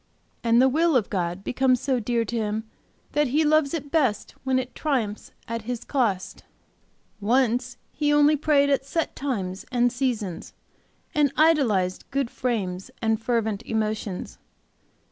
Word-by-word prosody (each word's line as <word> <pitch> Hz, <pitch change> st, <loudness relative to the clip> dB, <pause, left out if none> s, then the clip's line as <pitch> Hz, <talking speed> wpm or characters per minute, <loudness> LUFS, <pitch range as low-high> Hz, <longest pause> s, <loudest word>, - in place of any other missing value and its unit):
And 230 Hz, 0 st, +4 dB
the 260 Hz, -, +6 dB
will 320 Hz, +3 st, +2 dB
of 230 Hz, -6 st, +1 dB
God 180 Hz, 0 st, -2 dB
becomes 255 Hz, +1 st, +2 dB
so 260 Hz, -1 st, 0 dB
dear 235 Hz, 0 st, 0 dB
to 235 Hz, -, -4 dB
him 215 Hz, -1 st, -1 dB, 0.5 s
that 295 Hz, -1 st, +2 dB
he 295 Hz, +6 st, +2 dB
loves 305 Hz, -2 st, +3 dB
it 285 Hz, -3 st, -6 dB
best 260 Hz, -11 st, +1 dB
when 265 Hz, -1 st, +1 dB
it 255 Hz, -1 st, -3 dB
'triumphs 240 Hz, -9 st, -2 dB, 0.2 s
at 230 Hz, 0 st, -3 dB
his 245 Hz, -1 st, -4 dB
cost.' 220 Hz, -9 st, -1 dB, 0.8 s
"Once 245 Hz, +2 st, +1 dB
he 295 Hz, -1 st, 0 dB
only 295 Hz, +1 st, +5 dB
prayed 285 Hz, -1 st, +3 dB
at 275 Hz, -1 st, +2 dB
set 310 Hz, +4 st, -2 dB
times 195 Hz, -9 st, -3 dB
and 245 Hz, -1 st, +3 dB
seasons, 235 Hz, -9 st, -2 dB, 0.6 s
and 295 Hz, -2 st, +3 dB
idolized 235 Hz, -, +3 dB
good 270 Hz, -3 st, -1 dB
frames 190 Hz, -7 st, -2 dB
and 225 Hz, -1 st, 0 dB
fervent 220 Hz, -3 st, 0 dB
emotions. 215 Hz, -3 st, -3 dB
245 Hz, 145 wpm, -25 LUFS, 215-280 Hz, 0.8 s, the